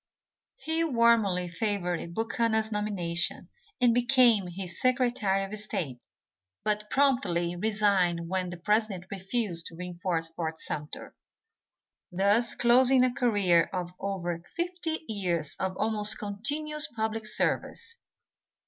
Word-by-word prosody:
He 325 Hz, -8 st, -1 dB
warmly 230 Hz, -, +3 dB
favored 175 Hz, -2 st, -2 dB
Buchanan's 225 Hz, -1 st, 0 dB
nomination 190 Hz, -5 st, -1 dB, 0.3 s
and 245 Hz, -2 st, +4 dB
became 245 Hz, -5 st, +4 dB
his 175 Hz, -1 st, -6 dB
Secretary 245 Hz, -6 st, +1 dB
of 205 Hz, +2 st, -6 dB
State, 155 Hz, -11 st, -4 dB, 0.6 s
but 210 Hz, 0 st, -1 dB
promptly 240 Hz, -12 st, +1 dB
resigned 190 Hz, -4 st, +1 dB
when 185 Hz, 0 st, -1 dB
the 175 Hz, -, -7 dB
president 210 Hz, 0 st, 0 dB
refused 195 Hz, -3 st, -2 dB
to 165 Hz, -, -10 dB
reinforce 175 Hz, -1 st, -1 dB
Fort 165 Hz, -1 st, -5 dB
Sumter; 150 Hz, -2 st, -4 dB, 1.0 s
thus 200 Hz, +6 st, +2 dB
closing 255 Hz, +2 st, +5 dB
a 255 Hz, -1 st, +2 dB
career 200 Hz, -9 st, +3 dB
of 180 Hz, -2 st, -4 dB
over 175 Hz, -4 st, -3 dB
fifty 340 Hz, -2 st, -3 dB
years 175 Hz, -8 st, -2 dB
of 185 Hz, -1 st, -2 dB
almost 215 Hz, 0 st, +2 dB
continuous 290 Hz, +9 st, -1 dB
public 220 Hz, -1 st, -3 dB
service. 460 Hz, -, -2 dB
205 Hz, 110 wpm, -28 LUFS, 175-235 Hz, 1.0 s, closing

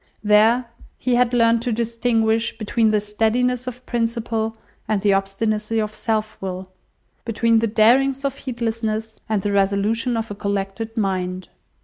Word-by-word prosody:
There, 220 Hz, +4 st, +4 dB, 0.3 s
he 250 Hz, -, -1 dB
had 245 Hz, 0 st, +3 dB
learnt 230 Hz, -1 st, +3 dB
to 240 Hz, -, -1 dB
distinguish 230 Hz, 0 st, 0 dB
between 220 Hz, 0 st, +1 dB
the 215 Hz, -1 st, +3 dB
steadiness 230 Hz, +4 st, 0 dB
of 250 Hz, 0 st, -7 dB
principle 230 Hz, -2 st, -2 dB, 0.3 s
and 215 Hz, -2 st, +1 dB
the 200 Hz, 0 st, +3 dB
obstinacy 210 Hz, +3 st, -1 dB
of 215 Hz, 0 st, -2 dB
self 215 Hz, 0 st, -2 dB
will, 185 Hz, 0 st, -5 dB, 0.5 s
between 230 Hz, 0 st, +2 dB
the 230 Hz, -, +1 dB
darings 260 Hz, +6 st, +3 dB
of 275 Hz, -1 st, -1 dB
heedlessness 225 Hz, -3 st, -3 dB
and 210 Hz, -3 st, 0 dB
the 205 Hz, -, 0 dB
resolution 205 Hz, +5 st, +1 dB
of 225 Hz, -1 st, -3 dB
a -, -, -2 dB
collected 200 Hz, +3 st, -3 dB
mind. 185 Hz, -3 st, -2 dB
225 Hz, 145 wpm, -21 LUFS, 210-235 Hz, 0.5 s, There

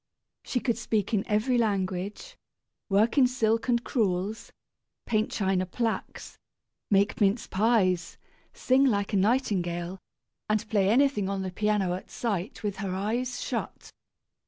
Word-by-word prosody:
She 250 Hz, -, -2 dB
could 235 Hz, -2 st, -1 dB
speak 220 Hz, -3 st, -1 dB
in 205 Hz, -2 st, +2 dB
every 230 Hz, +4 st, +2 dB
language, 200 Hz, -, -2 dB, 0.5 s
work 215 Hz, +7 st, +3 dB
in 255 Hz, -, +6 dB
silk 230 Hz, -1 st, 0 dB
and 235 Hz, -1 st, +2 dB
crewels, 205 Hz, -2 st, -1 dB, 0.5 s
paint 215 Hz, -1 st, +1 dB
china 190 Hz, -2 st, 0 dB
plaques, 225 Hz, +4 st, -4 dB, 0.5 s
make 200 Hz, +2 st, +2 dB
mince 205 Hz, +3 st, +2 dB
pies, 190 Hz, -4 st, +1 dB, 0.3 s
sing 260 Hz, +1 st, +2 dB
like 205 Hz, -6 st, +1 dB
a -, -, +3 dB
nightingale, 190 Hz, -5 st, 0 dB, 0.5 s
and 215 Hz, +1 st, 0 dB
play 200 Hz, -3 st, +3 dB
anything 240 Hz, -4 st, +3 dB
on 195 Hz, -1 st, -2 dB
the 185 Hz, -, -4 dB
piano 205 Hz, -2 st, 0 dB
at 185 Hz, -, -7 dB
sight 210 Hz, -3 st, -3 dB
with 205 Hz, -2 st, -2 dB
her 195 Hz, -2 st, -3 dB
eyes 245 Hz, +6 st, -2 dB
shut! -, -, -5 dB
210 Hz, 135 wpm, -27 LUFS, 190-235 Hz, 0.5 s, in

